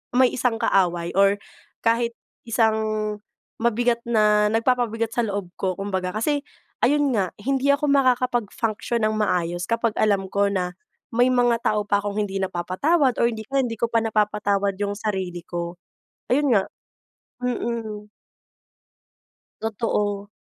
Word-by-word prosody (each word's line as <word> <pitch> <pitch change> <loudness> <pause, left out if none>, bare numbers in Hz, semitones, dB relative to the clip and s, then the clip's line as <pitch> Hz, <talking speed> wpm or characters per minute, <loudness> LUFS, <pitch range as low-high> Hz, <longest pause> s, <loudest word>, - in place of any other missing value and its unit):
may 255 -1 +5
isang 250 -2 0
kaaway, 175 -6 +1
or 200 0 +5 0.5
kahit 230 +1 +2 0.3
isang 220 -1 +2 0.8
mabigat 235 +1 +2
na 210 -2 +4
nagpapabigat 230 -1 +1
sa - - -2
loob 200 -3 -3
ko 185 -1 -1
kumbaga, 190 -2 -2
kasi 285 +7 0 0.4
ayun 290 +2 +3
nga, 190 -4 +1
hindi 270 +3 0
ako 295 +1 -2
makakapag-function 240 -4 +1
ng 215 0 +1
maayos 175 -4 0
kapag 230 0 +1
alam 200 -3 +2
ko 200 0 +2
na 180 -2 -1 0.4
may 245 +2 +4
mga 245 -2 +3
tao 210 -1 +1
pa 205 -1 +3
akong 205 0 -4
hindi 195 -1 -3
napapatawad 235 - +1
or 235 - +5
hindi 220 -2 -5
hindi 255 -4 +1
ko 235 - +1
pa 230 0 +2
napapatawad 210 -2 +1
yung 205 0 0
sarili 190 -5 -3
ko. 170 0 -4 0.6
Ayun 285 +3 +3
nga 195 -2 +3 0.8
Mm. 230 -4 -3 1.6
Totoo. 210 -2 -1
215 Hz, 130 wpm, -23 LUFS, 200-240 Hz, 1.6 s, may